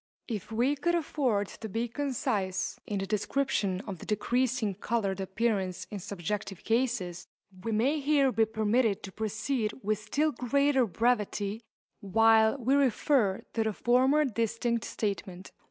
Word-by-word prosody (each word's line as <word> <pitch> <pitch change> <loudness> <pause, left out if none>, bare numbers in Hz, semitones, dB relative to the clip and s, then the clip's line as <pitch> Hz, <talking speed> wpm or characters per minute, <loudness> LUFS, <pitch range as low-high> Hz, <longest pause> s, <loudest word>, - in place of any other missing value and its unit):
If 215 -3 -5
we 245 +6 +2
could 345 +5 +1
afford 265 -10 0
to 220 - -8
be 230 +4 -1
concise 220 -8 -2
in 205 - -2
the 195 - -2
description 210 -2 0
of 195 -5 -7
the - - -10
decreasing 240 0 0
coloured 200 -1 -1
appearance 190 -2 -1
in 205 - -4
subjective 195 +1 -4
cases, 225 -7 -1 0.4
we 225 - -2
may 255 +8 +2
here 280 -2 +3
be 225 -2 +3
permitted 220 0 +1
to 195 - -7
proceed 220 +2 -2
with 210 0 0
still 285 +9 0
greater 270 0 +2
brevity 215 -1 0 0.4
while 220 +3 +4
we 260 +1 +1
refer 265 -6 +2
to 225 - +1
the 220 -1 -1
former 260 +7 +3
distinct 230 -1 -1
statement. 195 -3 -4
225 Hz, 140 wpm, -29 LUFS, 205-255 Hz, 0.4 s, while